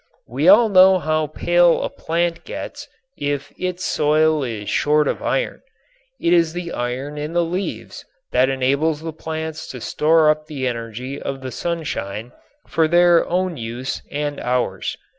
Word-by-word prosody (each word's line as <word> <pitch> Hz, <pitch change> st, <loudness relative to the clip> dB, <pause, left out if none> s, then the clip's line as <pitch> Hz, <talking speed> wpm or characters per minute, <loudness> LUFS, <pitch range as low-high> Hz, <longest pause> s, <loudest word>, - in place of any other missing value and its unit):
We 135 Hz, +8 st, -1 dB
all 220 Hz, +4 st, +7 dB
know 190 Hz, -1 st, +6 dB
how 155 Hz, -2 st, 0 dB
pale 175 Hz, +3 st, +3 dB
a -, -, 0 dB
plant 170 Hz, +1 st, -2 dB
gets -, -, -7 dB, 0.3 s
if 145 Hz, -1 st, -3 dB
its 180 Hz, 0 st, -3 dB
soil 155 Hz, 0 st, +2 dB
is 110 Hz, -5 st, -5 dB
short 150 Hz, 0 st, +2 dB
of -, -, -2 dB
iron. -, -, -1 dB, 0.6 s
It 170 Hz, -, +2 dB
is 165 Hz, -2 st, +3 dB
the 175 Hz, -1 st, -5 dB
iron 130 Hz, +5 st, -4 dB
in 150 Hz, +2 st, -4 dB
the 175 Hz, 0 st, +2 dB
leaves 180 Hz, +4 st, -5 dB, 0.3 s
that 130 Hz, +1 st, +3 dB
enables 140 Hz, +4 st, +1 dB
the 160 Hz, 0 st, -5 dB
plants 160 Hz, 0 st, -5 dB
to 125 Hz, -, -7 dB
store 155 Hz, +5 st, +3 dB
up 155 Hz, 0 st, -4 dB
the 140 Hz, -4 st, -4 dB
energy 120 Hz, +3 st, -4 dB
of 135 Hz, -1 st, -4 dB
the 130 Hz, -1 st, -6 dB
sunshine 125 Hz, -, -4 dB, 0.4 s
for 160 Hz, -1 st, +2 dB
their 175 Hz, 0 st, +4 dB
own 180 Hz, -1 st, 0 dB
use 120 Hz, +3 st, -4 dB
and 145 Hz, -1 st, -3 dB
ours. 125 Hz, -6 st, -1 dB
155 Hz, 160 wpm, -21 LUFS, 130-170 Hz, 0.6 s, all